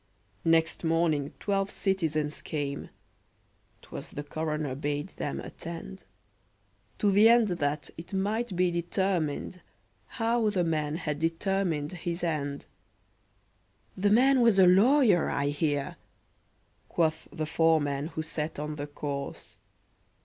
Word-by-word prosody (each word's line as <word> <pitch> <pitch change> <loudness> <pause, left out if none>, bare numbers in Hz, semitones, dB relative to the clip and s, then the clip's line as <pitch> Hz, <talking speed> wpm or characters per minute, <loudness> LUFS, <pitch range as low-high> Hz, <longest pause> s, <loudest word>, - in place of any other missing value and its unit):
Next 165 0 +2
morning 160 -3 +1
twelve 195 -1 0
citizens 155 -8 -1
came 145 -2 -4 0.9
('Twas - - -8
the 145 - -6
coroner 150 -2 -3
bade 145 +2 -3
them 70 - -3
attend), 170 - -8 0.9
To 205 - +2
the 210 +3 +7
end 235 -2 +5
that 150 -4 -2
it 165 - -10
might 205 +2 -1
be 180 0 +2
determined 175 -1 -1 0.5
How 230 -1 +1
the 190 -4 +1
man 155 -2 -1
had 150 -3 -3
determined 165 -2 0
his 175 -1 -4
end! 145 -4 -2 1.3
"The 200 +2 +2
man 255 +4 +5
was 230 -4 +5
a 190 - +8
lawyer, 205 - +5
I 140 0 0
hear," 145 -1 -1 0.9
Quoth 160 -2 0
the 155 - -3
foreman 155 -3 +2
who 160 -1 -4
sat 155 0 -4
on 150 +1 -4
the 145 0 -4
corse. 140 -1 -6
165 Hz, 120 wpm, -28 LUFS, 150-195 Hz, 1.3 s, a